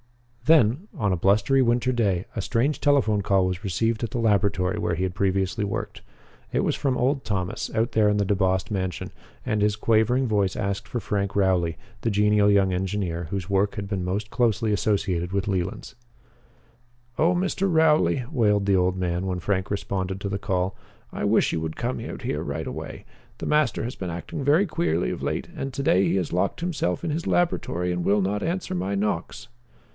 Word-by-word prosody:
Then, 155 Hz, -, +4 dB
on 105 Hz, -4 st, +1 dB
a -, -, +2 dB
blustery 105 Hz, +9 st, +3 dB
winter 120 Hz, +1 st, +2 dB
day, 100 Hz, -7 st, +1 dB
a 110 Hz, -, -1 dB
strange 125 Hz, +8 st, 0 dB
telephone 130 Hz, -8 st, +3 dB
call 95 Hz, -1 st, +2 dB
was 90 Hz, +2 st, -3 dB
received 115 Hz, +4 st, 0 dB
at 115 Hz, -, -1 dB
the -, -, -4 dB
laboratory 100 Hz, -3 st, +1 dB
where 85 Hz, -5 st, 0 dB
he 90 Hz, -, -2 dB
had 95 Hz, -1 st, -1 dB
previously 95 Hz, +1 st, 0 dB
worked. 100 Hz, -, -4 dB, 0.5 s
It -, -, +1 dB
was -, -, +1 dB
from 135 Hz, -3 st, 0 dB
old 135 Hz, +2 st, +1 dB
Thomas, 95 Hz, -3 st, -3 dB
out 115 Hz, +1 st, +1 dB
there 105 Hz, -1 st, +4 dB
in 105 Hz, -, +1 dB
the 100 Hz, -, +1 dB
DeBost 95 Hz, -1 st, +1 dB
mansion, 95 Hz, -4 st, -3 dB, 0.3 s
and 110 Hz, -1 st, 0 dB
his 105 Hz, 0 st, +2 dB
quavering 115 Hz, +4 st, +2 dB
voice 100 Hz, -4 st, +1 dB
asked 100 Hz, 0 st, -2 dB
for 120 Hz, -, -2 dB
Frank 100 Hz, -2 st, -2 dB
Rowley, 90 Hz, -4 st, +2 dB, 0.2 s
the 115 Hz, -, 0 dB
genial 105 Hz, 0 st, +3 dB
young 100 Hz, -2 st, +3 dB
engineer 90 Hz, -2 st, -2 dB
whose 95 Hz, -1 st, -4 dB
work 100 Hz, +1 st, +1 dB
had 100 Hz, -1 st, -4 dB
been 95 Hz, -3 st, -2 dB
most 100 Hz, +4 st, -2 dB
closely 110 Hz, -3 st, +1 dB
associated 95 Hz, -4 st, 0 dB
with 100 Hz, +1 st, -1 dB
Leland's. 95 Hz, +3 st, -3 dB, 1.3 s
"Oh, 165 Hz, +3 st, +4 dB
Mr. 190 Hz, +1 st, 0 dB
Rowley," 155 Hz, -5 st, +3 dB
wailed 105 Hz, -7 st, +2 dB
the 100 Hz, -1 st, +3 dB
old 90 Hz, 0 st, +2 dB
man, 90 Hz, 0 st, -1 dB
when 90 Hz, -1 st, -2 dB
Frank 95 Hz, +1 st, -1 dB
responded 95 Hz, -1 st, -2 dB
to 100 Hz, -, -3 dB
the 100 Hz, 0 st, -2 dB
call, 95 Hz, 0 st, -1 dB, 0.4 s
"I -, -, -4 dB
wish -, -, +3 dB
you 80 Hz, -, -1 dB
would 80 Hz, -1 st, -4 dB
come 125 Hz, +2 st, -2 dB
out -, -, -7 dB
here 75 Hz, -, -2 dB
right 75 Hz, +2 st, -4 dB
away. -, -, -7 dB, 0.3 s
The -, -, -6 dB
master 150 Hz, -9 st, +1 dB
has 120 Hz, +3 st, -4 dB
been 95 Hz, -, -5 dB
acting 85 Hz, -, -5 dB
very 150 Hz, +8 st, +4 dB
queerly 160 Hz, -, 0 dB
of -, -, -5 dB
late, -, -, -2 dB
and 135 Hz, 0 st, -4 dB
to 140 Hz, -, -3 dB
day 95 Hz, -7 st, +4 dB
he -, -, +1 dB
has 90 Hz, -4 st, -1 dB
locked 90 Hz, +3 st, 0 dB
himself 165 Hz, -, -2 dB
in 160 Hz, -, -1 dB
his 165 Hz, +3 st, -3 dB
laboratory 90 Hz, -, 0 dB
and 90 Hz, 0 st, -2 dB
will 100 Hz, +2 st, +3 dB
not 100 Hz, +2 st, -1 dB
answer 175 Hz, +2 st, -2 dB
my 95 Hz, +3 st, -1 dB
knocks." 100 Hz, -4 st, -2 dB
100 Hz, 200 wpm, -25 LUFS, 95-115 Hz, 1.3 s, Then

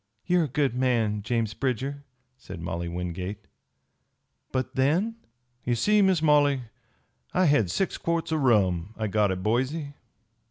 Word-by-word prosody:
"You 180 Hz, 0 st, +3 dB
are -, -, +2 dB
a -, -, -3 dB
good 140 Hz, -1 st, 0 dB
man, 120 Hz, -5 st, +1 dB
James 115 Hz, 0 st, -1 dB
Bridger," 135 Hz, +3 st, -2 dB, 0.3 s
said 95 Hz, -8 st, -10 dB
Molly 85 Hz, +1 st, -4 dB
Wingate. 90 Hz, +4 st, -5 dB, 1.1 s
"But 130 Hz, -1 st, -2 dB
then?" 175 Hz, -, +1 dB, 0.5 s
"Ye 120 Hz, -, 0 dB
see, 210 Hz, -, +3 dB
Miss 190 Hz, -5 st, +3 dB
Molly, 145 Hz, -3 st, +4 dB, 0.7 s
I 185 Hz, -, +4 dB
had 130 Hz, -, +3 dB
six 190 Hz, -, -1 dB
quarts 170 Hz, -1 st, -1 dB
o' 160 Hz, -, +2 dB
rum 105 Hz, -, +2 dB
I 110 Hz, -, -2 dB
got 105 Hz, -1 st, +2 dB
at 95 Hz, 0 st, -3 dB
Boise. 130 Hz, +7 st, -1 dB
125 Hz, 150 wpm, -26 LUFS, 105-150 Hz, 1.1 s, Molly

